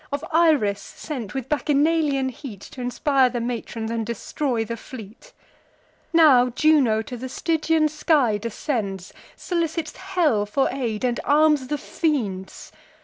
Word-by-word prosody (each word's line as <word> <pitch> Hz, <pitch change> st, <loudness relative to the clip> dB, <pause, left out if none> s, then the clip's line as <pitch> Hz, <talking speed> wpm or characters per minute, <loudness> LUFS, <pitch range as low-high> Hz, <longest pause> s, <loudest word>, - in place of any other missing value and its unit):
Of 285 Hz, +3 st, -3 dB
Iris 300 Hz, -12 st, +3 dB
sent, 255 Hz, -10 st, -7 dB
with 265 Hz, -2 st, -3 dB
Bacchanalian 295 Hz, -1 st, +1 dB
heat 240 Hz, -6 st, -9 dB
T' 255 Hz, -, -8 dB
inspire 260 Hz, +1 st, +2 dB
the 245 Hz, 0 st, -3 dB
matrons, 230 Hz, -1 st, -4 dB
and 230 Hz, -1 st, -1 dB
destroy 235 Hz, +2 st, -2 dB
the 230 Hz, -, -4 dB
fleet? 230 Hz, -, -11 dB, 0.8 s
Now 290 Hz, -7 st, +6 dB
Juno 255 Hz, -5 st, +3 dB
to 245 Hz, -, -7 dB
the 255 Hz, +2 st, -6 dB
Stygian 320 Hz, +2 st, +1 dB
sky 295 Hz, -8 st, +2 dB
descends, 205 Hz, -, -4 dB, 0.2 s
Solicits 330 Hz, -3 st, -2 dB
hell 340 Hz, -, 0 dB
for 270 Hz, +6 st, +1 dB
aid, 240 Hz, -5 st, -3 dB
and 245 Hz, -1 st, 0 dB
arms 300 Hz, -2 st, +3 dB
the 295 Hz, -, -1 dB
fiends. 225 Hz, -, -3 dB
265 Hz, 135 wpm, -23 LUFS, 230-305 Hz, 0.8 s, Now